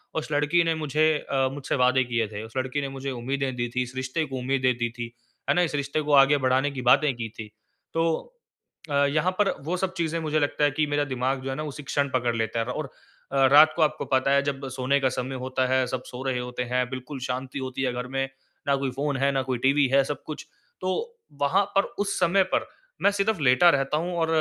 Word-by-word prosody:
उस 155 -1 -3
लड़की 150 +4 +3
ने 165 -1 +1
मुझे 155 0 0 0.3
अ, 135 -1 +2
मुझसे 145 -2 -3
वादे 125 +1 +4
किये 120 -3 -1
थे। 105 +1 -7
उस 110 - -11
लड़की 130 +2 -1
ने 140 - -3
मुझे 135 0 -5
उम्मीदें 130 +1 -2
दी 120 0 -1
थीं, 125 - +2
इस 125 +1 -9
रिश्ते 130 +5 -2
को 135 -2 -6
उम्मीदें 130 +1 -1
दे - - 0
दी 120 -1 0
थीं, 120 -1 -4 0.4
है - - +5
ना? 180 - +4
इस 160 -4 0
रिश्ते 140 +2 -1
को 150 -1 -1
आगे 140 +1 +6
बढ़ाने 130 +2 +2
की 130 -2 -5
बातें 135 +3 +4
की 115 -1 -5
थीं। 110 -1 -6 0.4
तो 165 0 +1 0.8
अ, - - -3
यहाँ 155 +6 +1
पर, 205 - +4 0.2
वो 180 +3 -1
सब 190 0 -2
चीज़ें 165 -1 -1
मुझे 155 -1 0
लगता 145 0 0
है 145 - +4
कि 155 +1 +1
मेरा 145 0 +1
दिमाग 130 +1 -1
जो 135 - -4
है 135 - -2
ना 155 - -4
उसी 150 -1 -7
क्षण 140 0 0
पकड़ 120 -2 +1
लेता 115 0 -1
है। 115 - 0
और 135 +3 -4 0.4
अ, 135 -1 +4
रात 155 +2 +8
को 165 - -1
आपको 155 0 +1
पता 130 +1 +2
है, 140 - +4
जब 135 -1 -3
सोने 130 +2 +1
का 130 -1 +2
समय 130 +1 -4
होता 130 0 0
है, 130 0 +2
सब 125 0 -4
सो 125 +1 -8
रहे 130 -2 -1
होते 125 0 -4
हैं, 125 0 +2
बिल्कुल 130 +2 -6
शांति 130 +2 -3
होती 130 0 -4
है 125 -1 0
घर 125 +1 -4
में 135 0 0 0.4
ना 140 - +4
कोई 135 -1 -2
फ़ोन 140 +1 -2
है 140 +1 +2
ना 135 - 0
कोई 130 -1 -2
टीवी 140 0 +4
है 140 - +6
सब 145 +2 -5
कुछ 155 - -7 0.3
तो 185 - -1 0.5
वहाँ 180 +8 +3
पर 195 - +5 0.2
उस 200 0 -1
समय 190 +3 +4
पर - - +1 0.3
मैं 200 - +5
सिर्फ़ 200 -1 0
लेटा 135 +6 +6
रहता 135 +1 0
हूँ 175 +3 -2
और 165 - +2
135 Hz, 250 wpm, -26 LUFS, 130-150 Hz, 0.8 s, रात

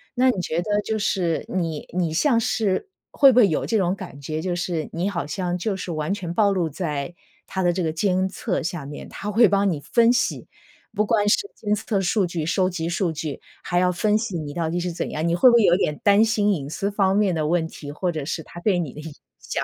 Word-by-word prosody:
那 255 +1 +4
你 240 - 0
觉 170 0 -1
得 205 +2 0
就 220 +1 -2
是 175 -5 0
你 165 -5 -3
你 170 -3 +1
像 235 - +3
是 225 - 0 0.2
会 275 -2 +6
不 250 - 0
会 225 - +7
有 160 - -1
这 225 - +1
种 185 -2 +1
感 185 -7 -9
觉， 155 +3 -4
就 180 +1 -2
是 175 -3 -3
你 175 +3 -1
好 170 -7 -3
像 180 +3 -2
就 195 +2 -2
是 185 -2 -5
完 155 +3 -2
全 185 -5 -4
暴 205 +1 +3
露 180 -4 0
在 150 -1 -4 0.3
它 190 - -2
的 175 - +3
这 185 - -2
个 160 -2 0
监 185 +3 +1
测 190 0 -2
下 170 -3 -4
面， 145 +1 -8
它 210 - -5
会 225 +2 +6
帮 200 0 +2
你 155 - -3
分 235 +10 +3
析， 250 - -1 0.5
不 210 0 +1
光 210 -2 +2
是 405 - +2
监 210 -1 -1
测 210 -1 -1
数 195 +2 +1
据、 170 -2 -3
收 185 +3 +1
集 170 -3 -3
数 175 0 0
据， 155 -2 -5 0.2
还 175 - 0
要 180 0 +3
分 210 +4 +1
析 215 -5 -3
你 150 -2 -5
到 165 0 -1
底 175 +2 -1
是 175 0 -2
怎 165 - -4
样， 155 +2 -2
你 170 - +2
会 250 +9 +7
不 235 - +5
会 235 - +5
有 175 -3 +5
点 150 -5 0
担 205 0 +5
心 210 -2 +2
隐 145 -6 -4
私 200 +6 -2
方 195 -2 +2
面 205 -3 +2
的 155 -2 -1
问 165 0 +1
题， 145 -3 -9
或 175 +4 -2
者 155 -3 -4
是 160 +2 -3
它 175 - -11
对 190 +1 +1
你 160 -7 -3
的 150 - -9
影 160 0 -8 0.3
响？ - - -3
180 Hz, 270 characters per minute, -23 LUFS, 165-205 Hz, 0.5 s, 会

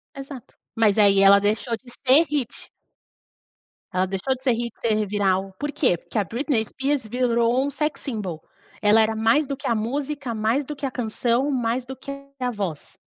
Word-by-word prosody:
Exato, 270 -3 -10 0.2
mas 220 -2 +3
aí 200 -2 +5
ela 200 +1 +7
deixou 220 +4 0
de 245 -2 -16
ser 275 +7 +4
hit. 275 -5 -4 1.2
Ela 185 +1 +2
deixou 195 +8 -1
de 260 - -17
ser 255 - +3
hit, 235 0 -2
ser 215 -2 +1
viral, 195 -1 0
por 290 0 -2
quê? 245 - +2
Porque 220 - -8
a - - +2
Britney 235 - -1
Spears 270 -1 -2
virou 240 +2 +1
um - - -1
sexy 300 +2 -3
simbol, 185 -8 -5 0.4
ela 215 +1 +5
era 220 0 +1
mais 230 +7 +2
do 275 - -3
que 280 +1 -6
a 235 - +2
música, 270 +3 -3
mais 225 +6 0
do 300 - -6
que 280 - -5
a 260 - -2
canção, 240 +3 0
mais 245 -1 -1
do 265 +1 -7
que 270 +2 -8 0.3
a 250 -1 -1
voz. 190 -9 -5
235 Hz, 190 wpm, -23 LUFS, 215-270 Hz, 1.2 s, ela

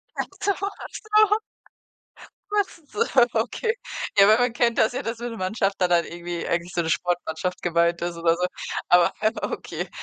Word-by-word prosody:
Ach - - -1 0.2
so, 405 - +2
ach 400 +1 -5
so. 430 -1 +3 1.1
Was 410 -4 0
ist 300 -4 -27
so 440 - +1 0.3
okay. 245 - 0 0.4
Ja, 200 0 +7
wenn 220 +2 +6
man 245 -1 +2
kennt 235 -1 +1
das 220 - +4
ja, 260 +3 -3
dass 230 0 -4
wenn 240 0 -4
'ne - - -7
Mannschaft 195 +1 0
da 180 - +3
dann 170 -1 +3
irgendwie 175 0 -5
eigentlich 170 +1 -2
so 170 - 0
'ne 160 - -2
Sportmannschaft 175 +1 -2
gemeint 170 0 +2
ist 175 -1 -2
oder 165 0 +2
so, 180 +1 0 0.4
aber 175 -1 +5 0.3
okay, - - -4
190 Hz, 185 wpm, -24 LUFS, 175-245 Hz, 1.1 s, Ja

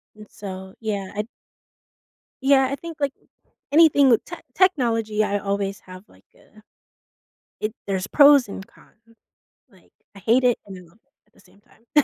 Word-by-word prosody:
And, 215 0 -14
so, 190 -1 -9
yeah 205 -4 -4
I'd 210 +1 -3 1.2
Yeah, 270 -1 +4
I - - -1
think, 330 +3 -9
like, 280 -2 -1 0.6
anything 290 -3 +5
with 230 - +3
tech - - -10
technology, 230 - +1
I 205 -1 -1
always 200 0 -3
have, 185 0 -13
like, - - -23
a 215 - -22 1.0
it 215 0 -3
there's 195 -1 -2
pros 285 -2 +6
and 195 -1 -8
cons. 230 +3 -25 0.5
Like, 190 -6 -25 0.2
I - - -11
hate 235 +7 +2
it 245 -2 +2
and 195 -2 -10
I - - -12
love 175 +4 -21
it 275 - -46 0.2
at - - -38
the - - -25
same 190 +2 -24
time. 235 +6 -1
215 Hz, 170 wpm, -22 LUFS, 195-270 Hz, 1.2 s, pros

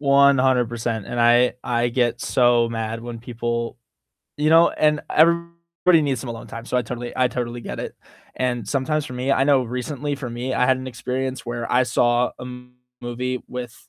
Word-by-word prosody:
100%, 130 -6 +3
and 120 - -4
I 120 +1 +5
I 120 0 0
get 120 -1 0
so 120 -2 +3
mad 115 0 -4
when 120 -1 -7
people 120 0 -3 0.6
You 150 +1 +1
know, 165 +1 +6
and 150 -1 +1
everybody 170 +1 +2
needs 135 -5 -1
some 120 - -6
alone 115 0 -7
time, 115 0 -8
so 125 - -1
I 125 - +2
totally 120 +1 -6
I 130 -1 +3
totally 120 0 -4
get - - -6
it, - - -6 0.4
and 125 -2 -1
sometimes 150 +2 0
for 125 - -8
me 125 +2 -2
I 135 - +3
know 140 -2 +4
recently 130 +4 -3
for 135 -3 -6
me, 125 +2 -3
I - - +2
had 130 0 +3
an 130 - -7
experience 130 +2 -4
where 120 0 -4
I 125 - +5
saw 120 0 +2
a 125 - -7 0.6
movie 125 +1 -3
with, 125 -1 -8
125 Hz, 185 wpm, -22 LUFS, 120-135 Hz, 0.6 s, know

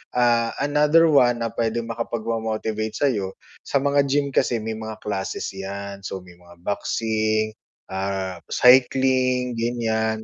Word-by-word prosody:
Ah, 120 -1 +2
another 150 +3 +4
one 120 -4 +4
na 115 - -2
pwedeng 115 0 -2
makapagpa-motivate 110 -1 -3
sa'yo, 105 -9 0 0.3
sa 140 -1 +1
mga 140 0 +3
gym 140 0 +1
kasi 115 -4 +1
may 110 0 -4
mga 110 0 -6
classes 100 -2 -3
'yan, 100 +1 -6
so, 95 -1 -6
may 90 -1 -16
mga 85 0 -17
boxing, 110 +1 0 0.4
ah, 95 -1 -3
cycling 130 -1 +3
ganyan. 110 -2 -1
115 Hz, 130 wpm, -23 LUFS, 105-125 Hz, 0.4 s, another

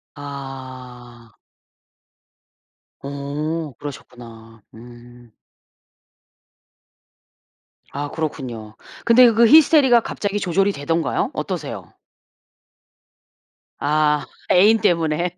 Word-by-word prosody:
아. 130 -4 -10 1.7
어 145 +2 -5
그러셨구나 115 -5 -11
음. 120 +1 -15 2.6
아 145 +1 -5
그렇군요. 125 -9 -6 0.3
근데 235 +1 +6
그 230 +1 +4
히스테리가 285 -4 +6
갑자기 205 -2 -4
조절이 195 +1 +1
되던가요? 165 0 -2
어떠세요? - - -6 1.9
아 150 0 +1 0.3
애인 205 +5 +5
때문에. 170 -1 0
145 Hz, 160 characters per minute, -20 LUFS, 125-180 Hz, 2.6 s, 근데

